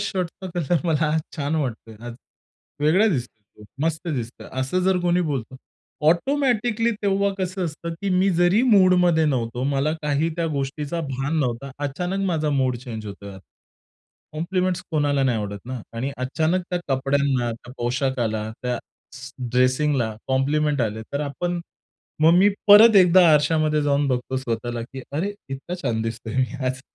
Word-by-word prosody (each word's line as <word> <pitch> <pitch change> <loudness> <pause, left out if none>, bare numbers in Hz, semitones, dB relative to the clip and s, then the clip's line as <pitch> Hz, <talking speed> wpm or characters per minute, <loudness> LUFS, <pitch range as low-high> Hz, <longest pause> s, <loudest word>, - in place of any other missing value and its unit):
शर्टचा 185 0 -3
कलर 170 -2 +1
मला 160 -1 +2
आज 160 - +2 0.2
छान 145 +1 -1
वाटतोय. 115 -6 -4
आज 120 - -6 0.7
वेगळा 175 +9 +4
दिसतोय, 110 - -5 0.2
मस्त 165 +2 -2
दिसतो. 120 -6 -4 0.2
असं 155 +8 0
जर 190 -1 +3
कोणी 175 0 +2
बोलतं. 130 -6 -3 0.5
ऑटोमॅटिकली 235 - +1
तेव्हा 200 0 +2
कसं 185 0 -2
असतं, 165 +1 -5
की 200 - -1
मी 195 +1 +3
जरी 175 +6 +3
मूडमध्ये 180 -7 +4
नव्हतो, 120 -3 -1
मला 140 +3 +1
काही 150 +2 +1
त्या 170 -1 0
गोष्टीचा 145 +3 -3
भान 135 +1 -2
नव्हता. 130 0 -2
अचानक 180 +8 -2
माझा 155 -4 0
मूड 130 -3 +1
चेंज 115 -3 -7
होतोय. 100 -1 -9 0.9
कॉम्प्लिमेंट 180 +3 -1
कोणाला 145 -3 +1
नाही 125 -4 +1
आवडत 100 -1 -4
ना? 130 -2 -5 0.2
आणि 130 +4 -2
अचानक 160 +8 0
त्या 180 - 0
कपड्यांना, 135 -2 +1
त्या 120 +2 -11
पोशाखाला, 120 -3 -1
त्या 125 -1 -1 0.4
स 130 +1 -9 0.2
ड्रेसिंगला 130 -2 +1
कॉम्प्लिमेंट 145 +2 +1
आले 110 0 -2
तर 140 - -1
आपण. 175 +4 -3 0.6
मग 160 +2 +6
मी 200 +2 +6 0.2
परत 210 +1 +9
एकदा 180 -1 +7
आरशामध्ये 150 0 +2
जाऊन 145 0 +1
बघतो 125 +1 -1
स्वतःला, 120 -1 -3
की 130 +2 -9
अरे 190 +8 -1 0.2
इतका 140 +7 -5
छान 110 -3 -1
दिसतोय 115 +1 -5
मी 130 +1 -1
आज. 130 0 -2
145 Hz, 150 wpm, -23 LUFS, 125-175 Hz, 0.9 s, परत